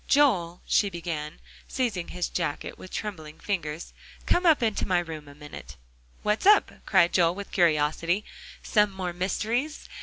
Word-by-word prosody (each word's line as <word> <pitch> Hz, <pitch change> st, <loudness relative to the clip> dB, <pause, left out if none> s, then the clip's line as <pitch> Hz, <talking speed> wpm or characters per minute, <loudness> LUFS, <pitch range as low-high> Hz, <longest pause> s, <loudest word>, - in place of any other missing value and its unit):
"Joel," 190 Hz, -13 st, +3 dB
she 205 Hz, -, +3 dB
began, 165 Hz, -4 st, -5 dB, 0.3 s
seizing 225 Hz, -9 st, -2 dB
his 180 Hz, -1 st, -3 dB
jacket 165 Hz, -4 st, -3 dB
with 185 Hz, -, -11 dB
trembling 160 Hz, -9 st, -6 dB
fingers, 165 Hz, -5 st, -4 dB, 0.3 s
"come 355 Hz, 0 st, +2 dB
up 305 Hz, -6 st, +5 dB
into 220 Hz, -2 st, 0 dB
my 185 Hz, -2 st, +2 dB
room 160 Hz, -4 st, -4 dB
a 145 Hz, -, -13 dB
minute." 145 Hz, -, -10 dB, 0.5 s
"What's 210 Hz, -, +1 dB
up?" 415 Hz, 0 st, +6 dB, 0.2 s
cried 175 Hz, -4 st, +4 dB
Joel 170 Hz, -1 st, +3 dB
with 200 Hz, 0 st, -7 dB
curiosity; 165 Hz, +3 st, +2 dB, 0.4 s
"some 210 Hz, -1 st, +3 dB
more 185 Hz, -2 st, -4 dB
mysteries? 225 Hz, -, -2 dB
180 Hz, 150 wpm, -27 LUFS, 165-210 Hz, 0.5 s, up